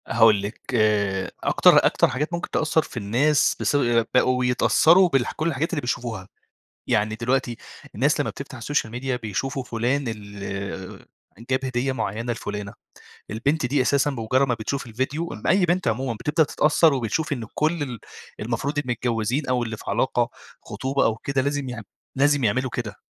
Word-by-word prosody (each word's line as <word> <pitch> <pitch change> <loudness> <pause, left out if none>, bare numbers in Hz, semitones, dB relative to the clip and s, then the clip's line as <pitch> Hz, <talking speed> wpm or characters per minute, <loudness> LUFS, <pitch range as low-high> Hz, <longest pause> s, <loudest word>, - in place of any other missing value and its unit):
هاقول 110 -3 +5
لِك 100 +3 -6
آآ 100 -4 +1
أكتر - - +5
أكتر - - +4
حاجات 150 +7 -3
ممكن 170 - -3
تأثّر 160 +1 +1
في 145 - -10
الناس 125 +8 +2
بس - - 0 0.4
بقوا 125 0 +3
يتأثّروا 165 +8 +5
بالح 135 -5 +1
كلّ 155 - -2
الحاجات 165 +1 -1
اللي 150 - -1
بيشوفوها، 120 -6 -3 0.6
يعني 110 +1 +1
دلوقتي 120 +1 -1 0.4
الناس - - +2
لمّا - - 0
بتفتح - - -9
السوشيال 120 -2 -1
ميديا 125 +1 -2
بيشوفوا 125 +4 -3
فلان 120 +5 -1
ال 100 -3 -6 0.4
جاب 130 +1 +1
هدية 130 +1 -1
معيّنة 115 0 -2
لفلانة، 105 -3 -5 0.6
البنت 140 +7 0
دي 135 +2 +1
أساسًا 140 +2 +2
بمجرّد 130 +2 +1
ما 125 - +1
بتشوف 120 +5 -3
الفيديو، 135 +8 -3
إ 110 - -9
أي 185 +2 +4
بنت 175 -1 0
عمومًا 120 +2 0
بتبدأ 150 +8 +1
تتأثّر 150 +1 +3
وبتشوف 135 +5 -1
إن 120 -5 -5
كلّ 155 0 0
ال 125 -5 -6 0.4
المفروض 120 +6 -2
المتجوّزين 125 0 -1
أو 125 -1 +1
اللي 110 -1 -5
في - - -12
علاقة 120 +2 +1 0.3
خطوبة 135 +1 -1
أو 110 - +2
كده 135 +3 -1
لازم 140 -1 -2
يعم 120 -3 -6 0.3
لازم 145 0 +3
يعملوا 130 +4 +1
كده. 115 -3 -5
125 Hz, 165 wpm, -24 LUFS, 110-140 Hz, 0.6 s, هاقول